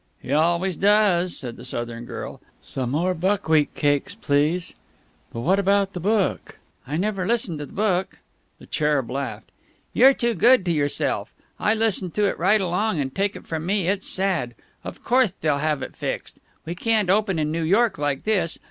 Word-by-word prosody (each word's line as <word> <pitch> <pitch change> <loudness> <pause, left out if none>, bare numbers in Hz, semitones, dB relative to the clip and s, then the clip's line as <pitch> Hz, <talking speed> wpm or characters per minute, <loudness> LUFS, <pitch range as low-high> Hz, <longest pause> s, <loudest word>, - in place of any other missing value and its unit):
"He 130 - -5
always 170 +4 +1
does," 195 -4 +3
said 120 -3 -5
the 120 - -11
Southern 120 -1 -4
girl. - - -7 0.2
"Some 130 -2 -4
more 170 +7 0
buckwheat 160 -4 +1
cakes, 145 +7 0
please. 155 -1 0 0.6
But 115 - -5
what 185 +10 +2
about 200 0 +2
the 180 - -5
book?" 205 +2 -1 0.3
"I 145 +4 -2
never 195 0 -1
listen 210 -9 0
to 145 - -6
the - - -16
book." 190 -3 -1 0.4
The - - -15
Cherub 150 -5 0
laughed. 140 +2 -5 0.4
"You're 270 +1 +6
too 235 -1 0
good 230 +2 +4
to 175 - +1
yourself! 145 -3 -1 0.3
I 215 - +2
listened 215 -5 0
to 210 - +2
it 200 - -1
right 195 +5 +3
along, 185 +1 0
and 135 -2 -3
take 200 +1 -1
it - - -10
from 160 0 -4
me 195 -2 0
it's 195 0 0
sad! 185 -11 0 0.3
Of - - -9
courthe 245 -6 +2
they'll 150 -3 +1
have 150 -2 -1
it - - -8
fixed. - - -5 0.3
We 165 - -4
can't 210 0 +1
open 200 -3 +1
in 155 -1 -1
New 165 +1 -2
York 200 +3 +2
like 145 -2 -1
this. 195 -6 +1
180 Hz, 185 wpm, -23 LUFS, 150-205 Hz, 0.6 s, You're